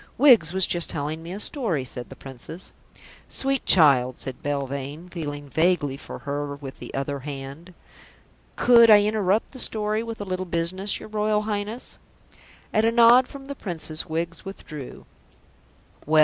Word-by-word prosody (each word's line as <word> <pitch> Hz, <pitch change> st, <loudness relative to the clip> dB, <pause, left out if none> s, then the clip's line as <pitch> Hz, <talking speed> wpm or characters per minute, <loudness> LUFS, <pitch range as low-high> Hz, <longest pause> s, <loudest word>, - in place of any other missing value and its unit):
"Wiggs 240 Hz, -, +6 dB
was 190 Hz, -1 st, +3 dB
just 175 Hz, -1 st, +1 dB
telling 155 Hz, +1 st, -3 dB
me 165 Hz, +1 st, -8 dB
a 195 Hz, -, -5 dB
story," 205 Hz, -, 0 dB
said 125 Hz, -1 st, -7 dB
the 135 Hz, -, -10 dB
Princess. 135 Hz, +7 st, -10 dB, 0.6 s
"Sweet 270 Hz, -1 st, -1 dB
child," 135 Hz, -7 st, +5 dB
said 130 Hz, -1 st, -7 dB
Belvane, 140 Hz, +3 st, -4 dB
feeling 145 Hz, -4 st, -5 dB
vaguely 160 Hz, -2 st, +1 dB
for -, -, -9 dB
her 145 Hz, 0 st, -3 dB
with 140 Hz, -2 st, -10 dB
the -, -, -8 dB
other 140 Hz, +1 st, -2 dB
hand. 140 Hz, +5 st, -8 dB, 0.8 s
"Could 235 Hz, -2 st, +6 dB
I 205 Hz, -1 st, +8 dB
interrupt 210 Hz, -1 st, +1 dB
the 260 Hz, -, -9 dB
story 215 Hz, -1 st, 0 dB
with 230 Hz, -1 st, -6 dB
a 205 Hz, -, -4 dB
little 185 Hz, -1 st, -3 dB
business, 175 Hz, +4 st, -2 dB
your -, -, -10 dB
Royal 210 Hz, 0 st, 0 dB
Highness?" 210 Hz, +3 st, -4 dB, 0.7 s
At 215 Hz, -, +3 dB
a 225 Hz, -, +3 dB
nod 240 Hz, +2 st, +6 dB
from 275 Hz, -2 st, -11 dB
the 280 Hz, -, -5 dB
Princess, 170 Hz, -, -2 dB
Wiggs 165 Hz, +1 st, -3 dB
withdrew. 155 Hz, -8 st, -9 dB, 1.0 s
"Well?" 155 Hz, 0 st, +4 dB
170 Hz, 160 wpm, -24 LUFS, 145-215 Hz, 1.0 s, I